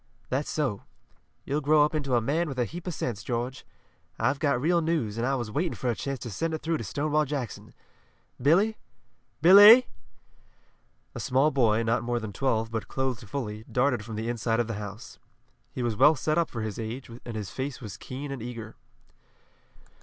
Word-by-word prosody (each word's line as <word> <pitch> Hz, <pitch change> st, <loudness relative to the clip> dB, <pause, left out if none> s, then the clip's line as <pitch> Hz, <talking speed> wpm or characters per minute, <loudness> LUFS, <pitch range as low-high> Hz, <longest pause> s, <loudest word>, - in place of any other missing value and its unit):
"That's 135 Hz, +3 st, -1 dB
so. 135 Hz, -10 st, -1 dB, 0.6 s
You'll 145 Hz, +2 st, -1 dB
grow 150 Hz, +1 st, +5 dB
up 150 Hz, -, -3 dB
into 140 Hz, -5 st, 0 dB
a 120 Hz, -, +3 dB
man 155 Hz, +9 st, 0 dB
with 135 Hz, -, -6 dB
a 125 Hz, -, +1 dB
heap 175 Hz, +7 st, -8 dB
of 180 Hz, -, -2 dB
sense, 110 Hz, -5 st, -3 dB
George. 125 Hz, +2 st, -3 dB, 0.5 s
I've 135 Hz, +1 st, +1 dB
got 140 Hz, -6 st, +1 dB
real 170 Hz, +5 st, +2 dB
news, 155 Hz, -11 st, -1 dB
and 115 Hz, +2 st, -1 dB
I 135 Hz, -, +1 dB
was 120 Hz, -4 st, -4 dB
waiting 165 Hz, +7 st, -1 dB
for 125 Hz, -, -1 dB
a -, -, -3 dB
chance 140 Hz, +3 st, -4 dB
to 120 Hz, -, -6 dB
send 160 Hz, -, -2 dB
it 155 Hz, -, -8 dB
through 165 Hz, +1 st, 0 dB
to -, -, -5 dB
Stonewall 150 Hz, +9 st, 0 dB
Jackson. 135 Hz, -6 st, -5 dB, 0.7 s
Billy! 195 Hz, -, +3 dB, 0.7 s
Billy!" 205 Hz, +8 st, +10 dB, 1.3 s
A -, -, -6 dB
small 135 Hz, +4 st, +2 dB
boy, 115 Hz, -5 st, +2 dB
not 115 Hz, 0 st, +1 dB
more 120 Hz, 0 st, -1 dB
than 110 Hz, -3 st, -6 dB
twelve, 115 Hz, -3 st, 0 dB
but 110 Hz, -1 st, -3 dB
clothed 130 Hz, -5 st, -3 dB
fully, 110 Hz, -5 st, -4 dB
darted 125 Hz, -3 st, +1 dB
from 110 Hz, 0 st, -7 dB
the 110 Hz, +2 st, -3 dB
inside 115 Hz, -1 st, 0 dB
of 120 Hz, -, +2 dB
the 115 Hz, -, -4 dB
house. 105 Hz, +2 st, -9 dB, 0.5 s
He 125 Hz, -, -4 dB
was 120 Hz, -2 st, 0 dB
well 150 Hz, +7 st, +6 dB
set 155 Hz, +2 st, 0 dB
up 170 Hz, -, 0 dB
for 115 Hz, -, -5 dB
his 110 Hz, -1 st, -5 dB
age, 115 Hz, +3 st, -6 dB
and 120 Hz, -, -7 dB
his 105 Hz, -3 st, -5 dB
face 135 Hz, 0 st, -4 dB
was 105 Hz, -5 st, -8 dB
keen 140 Hz, +2 st, -7 dB
and 135 Hz, -4 st, -5 dB
eager. 115 Hz, -2 st, -7 dB
130 Hz, 200 wpm, -27 LUFS, 115-150 Hz, 1.3 s, Billy